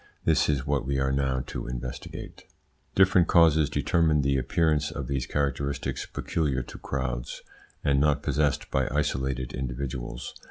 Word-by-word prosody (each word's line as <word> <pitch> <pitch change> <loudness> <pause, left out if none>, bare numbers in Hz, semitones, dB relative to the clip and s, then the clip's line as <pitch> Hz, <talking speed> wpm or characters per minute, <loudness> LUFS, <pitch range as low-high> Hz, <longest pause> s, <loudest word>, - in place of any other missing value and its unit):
This - - +3
is 70 -2 +1
what 70 -3 0
we 70 -1 0
are 65 0 +1
now 65 -2 0
to - - -5
investigate. 60 0 -7 0.5
Different 95 -3 +5
causes 80 -3 +5
determine 80 -4 +2
the 70 0 +2
appearance 75 +3 +1
of 70 - -5
these 65 0 -2
characteristics 70 0 -2
peculiar 70 -6 -1
to - - -11
crowds, 65 -3 -4 0.4
and 70 -1 +3
not 75 0 +2
possessed 75 -1 0
by 65 -1 +1
isolated 65 -2 -1
individuals. 65 -1 -4
70 Hz, 145 wpm, -27 LUFS, 65-75 Hz, 0.5 s, Different